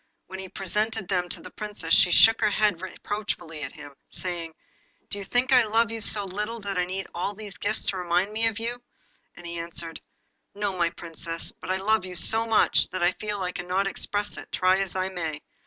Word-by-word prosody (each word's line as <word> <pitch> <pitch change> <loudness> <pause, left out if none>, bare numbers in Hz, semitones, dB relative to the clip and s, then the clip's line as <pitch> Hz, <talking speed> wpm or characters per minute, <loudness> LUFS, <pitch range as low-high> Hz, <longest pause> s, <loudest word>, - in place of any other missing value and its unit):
When 190 0 -8
he 190 -1 -5
presented 210 +2 -1
them 180 -2 +1
to - - -3
the - - -9
Princess, 205 -6 -3
she 180 - +6
shook 225 +5 +7
her 215 - +4
head 210 0 +3
at 165 - -17
him - - -12
reproachfully, 180 -6 -4 0.5
saying 170 -3 -3 0.6
'Do 205 - -1
you - - -4
think 245 +6 +1
I 250 -2 +8
love 225 +2 +2
you 225 -1 -4
so 205 -1 +1
little 210 +5 -3
that 200 -1 -3
I 180 0 +2
need 190 +2 -4
all 190 +4 -2
these 205 -1 -9
gifts 210 +2 0
to 190 - 0
remind 180 +3 +1
me 225 +1 +2
of 225 -2 -1
you?' 240 +2 -3 0.5
And 175 - -12
he 170 0 -4
answered 165 -1 -4 0.5
'No, 205 -2 -1
my 170 -2 +2
Princess; 165 0 -3
but - - -11
I 190 - +2
love 215 +2 +2
you 185 -1 -6
so 225 +5 +1
much 225 -1 +4
that 185 -1 -2
I 175 - +5
feel 205 0 -4
I 180 - -1
cannot 180 +2 -1
express 205 +1 -1
it, - - -9
try 185 +1 +3
as 195 -2 -1
I 185 0 0
may. 165 -5 -4
195 Hz, 220 wpm, -27 LUFS, 180-210 Hz, 0.6 s, I